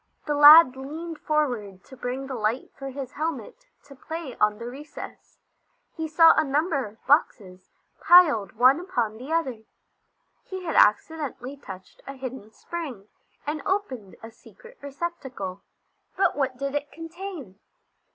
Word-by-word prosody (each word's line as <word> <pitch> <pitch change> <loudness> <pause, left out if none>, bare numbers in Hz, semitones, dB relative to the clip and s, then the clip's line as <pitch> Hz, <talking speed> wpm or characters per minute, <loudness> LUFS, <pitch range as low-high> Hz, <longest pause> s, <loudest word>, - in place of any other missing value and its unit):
The 295 - -1
lad 295 -1 +9
leaned 315 +5 -7
forward 240 -11 -2
to 265 - -14
bring 255 +2 -4
the 270 - -6
light 225 +1 -2
for 275 0 -7
his 270 -1 -7
helmet 330 +12 -5 0.2
to 285 -1 -15
play 315 -1 -7
on 210 0 +2
the 235 - -8
recess. 280 +5 -10 0.6
He 320 0 -3
saw 325 +1 +6
a 315 - +3
number 290 - 0
of 210 +2 -18
boxes, 190 - 0 0.3
piled 300 - +5
one 255 +6 +5
upon 240 - -2
the 260 +6 -9
other. 270 -9 -1 0.8
He 375 -1 -7
had 330 - -3
accidentally 275 +3 +1
touched 190 -9 -12
a 275 - -6
hidden 260 -5 -8
spring 255 - -8 0.4
and 300 0 -3
opened 260 - -3
a 225 - -9
secret - - -18
receptacle. 270 - -6 0.6
But 385 - +2
what 265 -3 -1
did 275 +1 -4
it 290 0 -3
contain? 330 - -9
275 Hz, 145 wpm, -25 LUFS, 240-320 Hz, 0.8 s, lad